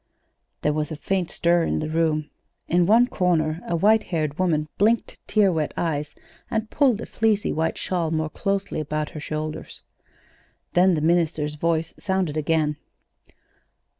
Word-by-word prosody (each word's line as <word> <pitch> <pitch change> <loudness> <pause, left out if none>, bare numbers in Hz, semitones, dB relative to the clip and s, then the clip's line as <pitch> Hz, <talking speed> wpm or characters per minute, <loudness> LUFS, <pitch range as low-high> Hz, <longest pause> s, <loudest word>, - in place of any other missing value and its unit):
There 150 - +2
was 150 -1 -2
a - - -3
faint 180 +3 -1
stir 170 0 +2
in - - 0
the 155 - -2
room. 155 -1 0 0.4
In 175 0 +3
one 230 +4 +6
corner 170 -7 0
a 175 - 0
white 215 +6 +4
haired 155 -3 -2
woman 155 -5 +1
blinked 220 +3 +1
tear 205 -3 +3
wet 155 -3 -2
eyes 150 -3 -2 0.3
and 220 -1 -2
pulled 255 -7 +2
a - - -5
fleecy 220 -2 +1
white 160 +1 -1
shawl 175 -3 -1
more 155 -1 -1
closely 195 -1 -2
about 150 0 -3
her 155 - -7
shoulders. 155 +1 -5 0.9
Then 180 0 +4
the 155 - -1
minister's 160 -2 +1
voice 165 +1 -1
sounded 190 -6 -1
again. 155 -1 +1
165 Hz, 155 wpm, -24 LUFS, 155-190 Hz, 0.9 s, one